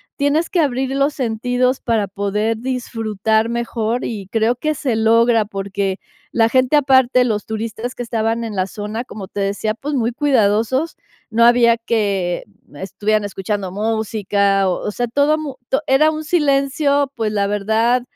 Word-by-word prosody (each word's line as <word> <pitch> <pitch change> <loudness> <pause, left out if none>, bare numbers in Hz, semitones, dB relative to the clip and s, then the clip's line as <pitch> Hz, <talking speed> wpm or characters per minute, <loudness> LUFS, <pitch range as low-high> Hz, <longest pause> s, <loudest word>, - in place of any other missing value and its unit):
Tienes 295 +3 +1
que 355 - 0
abrir 265 -2 0
los 275 +2 +1
sentidos 250 +1 0
para 220 -4 0
poder 210 +3 -1
disfrutar 225 -3 -1
mejor 235 0 -2
y 205 -5 -5
creo 225 +2 +2
que 310 +5 -1
se 260 -5 -2
logra 225 0 +3
porque 195 -1 -3 0.3
la 225 -1 +3
gente, 255 +3 +3
aparte, 260 -3 +4
los 215 -4 -1
turistas 225 +3 -4
que - - -7
estaban 230 0 -1
en 220 -3 -5
la 185 - +1
zona, 210 +4 -5
como 205 -5 -9
te 200 +1 -5
decía, 205 +2 -1
pues 290 +5 -5
muy 240 -2 0
cuidadosos. 260 +2 +1 0.3
No 230 +1 +3
había 235 -1 +5
que 200 -6 -1 0.3
estuvieran 205 +5 -1
escuchando 195 -1 -3
música. 205 -2 0
O 180 - -3
o - - -1
sea 240 +3 -2
todo 285 +5 +2
mu 290 -4 -5 0.3
era 295 +4 +4
un 310 0 -4
silencio, 280 -2 +1
pues, 220 -3 -1
la 200 -1 0
verdad, 220 +4 +1
230 Hz, 160 wpm, -19 LUFS, 210-255 Hz, 0.3 s, había